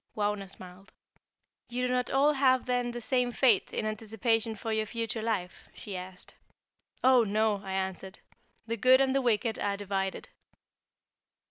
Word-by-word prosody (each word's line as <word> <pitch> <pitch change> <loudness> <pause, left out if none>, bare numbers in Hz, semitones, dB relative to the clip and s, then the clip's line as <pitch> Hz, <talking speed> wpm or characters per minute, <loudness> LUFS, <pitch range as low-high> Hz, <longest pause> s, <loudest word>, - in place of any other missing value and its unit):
Wauna 205 -2 -1
smiled. 185 0 -13 0.8
"You 250 +1 -2
do 250 - 0
not 250 -1 0
all 285 +3 +3
have 260 -2 +3
then 245 -1 0
the 240 0 -5
same 250 +1 0
fate 240 -5 +3
in - - -2
anticipation 225 +1 -1
for 220 +2 -4
your 220 0 -1
future 230 0 -3
life?" 205 -5 -3
she 200 - -7
asked. 180 0 -9 0.7
"Oh, 255 -2 +6
no!" 215 -1 +1
I 190 -1 -5
answered. 190 0 -4 0.5
"The 230 0 -3
good 255 +4 +6
and 265 -1 +2
the 275 - +2
wicked 225 -2 0
are 200 -1 -1
divided." 195 -1 -3
220 Hz, 155 wpm, -29 LUFS, 200-245 Hz, 0.8 s, Oh